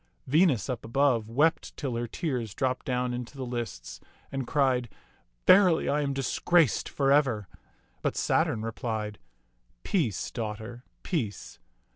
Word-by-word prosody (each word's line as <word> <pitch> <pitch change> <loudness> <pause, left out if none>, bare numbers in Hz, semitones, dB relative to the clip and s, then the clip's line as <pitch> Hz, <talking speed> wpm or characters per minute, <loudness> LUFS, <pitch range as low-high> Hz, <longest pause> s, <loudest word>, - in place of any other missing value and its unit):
Venus, 150 - +3
up 125 -4 -3
above, 120 -2 +1
wept 150 +8 +1
till 135 -5 -3
her 120 0 -2
tears 120 - -3
dropped 130 -1 -1
down 125 -1 0
into 125 +3 -6
the 130 - -4
lists, 120 - -5 0.3
and 135 -3 -3
cried, 130 -5 +1 0.3
" - - -41
Verily, 185 -4 +6
I 150 +1 +2
am 140 -1 -1
disgraced 140 - +2
for 135 -1 +1
ever"; 130 -9 +2 0.5
but - - -1
Saturn 110 - +1
replied, 110 -2 -4 0.6
"Peace, 135 - -1
daughter, 115 +1 -5 0.2
peace. 120 - -3
125 Hz, 135 wpm, -28 LUFS, 115-140 Hz, 0.6 s, Verily